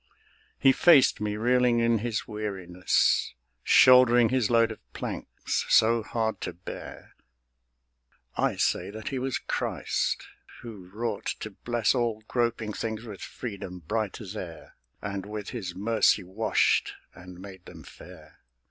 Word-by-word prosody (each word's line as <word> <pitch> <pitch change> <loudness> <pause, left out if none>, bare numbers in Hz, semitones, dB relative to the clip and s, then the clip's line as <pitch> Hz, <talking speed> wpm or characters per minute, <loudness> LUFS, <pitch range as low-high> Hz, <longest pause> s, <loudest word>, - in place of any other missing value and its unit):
He 135 - +5
faced 140 -7 +5
me, 105 0 -2
reeling 125 +1 +3
in 115 -1 +2
his 115 0 -3
weariness, 95 - 0 0.3
Shouldering 125 -2 +6
his 130 -4 +1
load 115 -1 +3
of 110 - -13
planks, - - -4
so 115 +1 +5
hard 110 0 -2
to - - -4
bear. 90 - -10 1.2
I - - +1
say - - 0
that 110 +7 -6
he 135 -3 -3
was 130 -1 -1
Christ, - - -2 0.4
who 105 -6 -10
wrought 110 0 -4
to 110 - -5
bless 120 +2 0
All 115 -4 -1
groping 115 -3 -1
things 110 0 -4
with 105 -5 -9
freedom 100 -6 -7
bright 105 +5 -3
as 105 -2 -8
air, 85 -6 -8 0.3
And 100 -1 -4
with 105 -1 -6
His 95 -8 -5
mercy 110 0 +2
washed 95 +5 +1 0.2
and 90 0 -12
made 95 -1 -11
them - - -12
fair. - - -15
110 Hz, 140 wpm, -27 LUFS, 100-120 Hz, 1.2 s, Shouldering